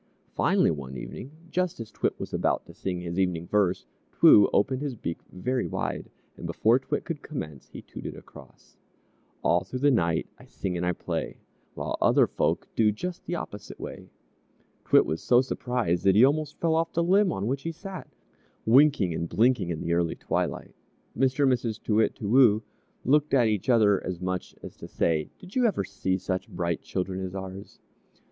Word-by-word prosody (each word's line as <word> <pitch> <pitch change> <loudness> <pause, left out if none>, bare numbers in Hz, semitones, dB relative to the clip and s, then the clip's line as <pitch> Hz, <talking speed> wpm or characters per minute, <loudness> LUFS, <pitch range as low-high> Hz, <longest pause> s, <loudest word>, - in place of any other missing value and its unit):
Finally, - - +3
one 65 -4 -6
evening 125 - -7 0.2
just 180 -5 -1
as 115 -1 -7
T'wit - - -2
was - - -6
about - - 0
to - - -13
sing 90 -2 -4
his 85 +1 -4
evening 90 -3 0
verse, 95 -2 +1 0.3
T'woo 105 - +7
opened 130 +6 +1
his 140 -4 -3
beak 85 -6 -5
very 125 +8 -2
wide, - - -3 0.3
and - - -7
before 115 +4 +3
T'wit 145 +2 -3
could 165 -4 -5
commence, 75 - -7
he - - -11
tooted - - -8
across: - - -16 0.7
"All - - +3
thro' 130 - -6
the 145 +2 +3
night 85 -9 +1
I - - -14
sing 95 -2 -4
and 85 - -2
I 90 0 +1
play, - - -4 0.4
While - - -3
other - - +5
folk - - -1
do 110 -2 +4
Just 180 - -6
the 175 - -2
opposite 105 - -7
way!" - - -8 0.8
T'wit - - +5
was 80 - -3
so 120 - +4
surprised 125 -8 -1
that 95 -1 +5
he 115 +5 +8
almost 150 +1 0
fell 165 -1 +2
off 165 +1 +1
the 170 - +1
limb 190 +2 +4
on 95 - -3
which 135 +4 -1
he 165 - -3
sat, 185 +2 -9 0.6
winking 125 - +5
and 85 +1 -3
blinking 115 -5 +2
in 80 -2 -3
the 85 - -1
early 85 -1 +1
twilight. - - -3 0.4
Mr. 135 +2 +2
and 135 - +5
Mrs. 115 -3 -2
Too 105 - 0
Wit, 110 - +2
Too 105 - -5
Woo 115 -2 +5 0.4
looked 145 +2 +3
at 125 -3 +5
each 105 +2 -2
other 105 -5 +4
as 90 -2 -4
much 90 0 -4
as - - -9
to - - -9
say, 80 -2 0
"Did 185 +1 -14
you 250 -2 +4
ever 195 - 0
see 95 0 -2
such 95 0 -3
bright 85 -2 -2
children 95 0 -3
as 95 0 -5
ours?" 95 0 -8
110 Hz, 195 wpm, -27 LUFS, 90-140 Hz, 0.8 s, he